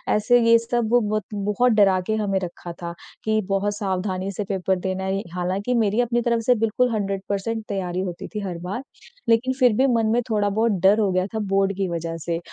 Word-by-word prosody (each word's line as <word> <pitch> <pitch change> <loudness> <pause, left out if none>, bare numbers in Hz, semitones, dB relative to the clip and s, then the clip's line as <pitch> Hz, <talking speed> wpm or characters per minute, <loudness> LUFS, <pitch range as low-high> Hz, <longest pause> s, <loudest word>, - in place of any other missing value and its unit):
ऐसे 245 +3 +4
ये 230 - +8
सब 230 -1 -1 0.2
बत 215 -2 0
बहुत 210 +5 +1
डरा 195 -3 +4
के 220 - +1
हमें 200 -3 0
रखा 175 0 -7
था 170 0 -4 0.3
कि 220 0 +1
बहुत 200 +1 0
सावधानी 190 -1 -2
से 205 +2 -3
पेपर 190 -1 0
देना 190 0 -3
है। 195 +1 -1
हालाँकि 190 +7 -1
मेरी 220 0 +2
अपनी 240 0 0
तरफ 235 -1 +1
से 250 - +5
बिल्कुल 225 +3 +1
100% 200 +2 -2
तैयारी 185 -2 -2
होती 180 -2 -5
थी 215 - -5
हर 180 -3 -4
बार, 205 +9 -4 0.5
लेकिन 245 +3 +3
फिर 250 -3 +5
भी 265 - +4
मन 225 -1 +2
में 240 - +2
थोड़ा 205 -2 +1
बहुत 220 +3 +1
डर 205 +3 +6
हो 200 -3 +2
गया 185 0 +1
था - - 0
बोर्ड 195 0 +2
की 195 -1 0
वज़ह 165 -1 -3
से 170 -1 -1
205 Hz, 210 wpm, -23 LUFS, 190-225 Hz, 0.5 s, ये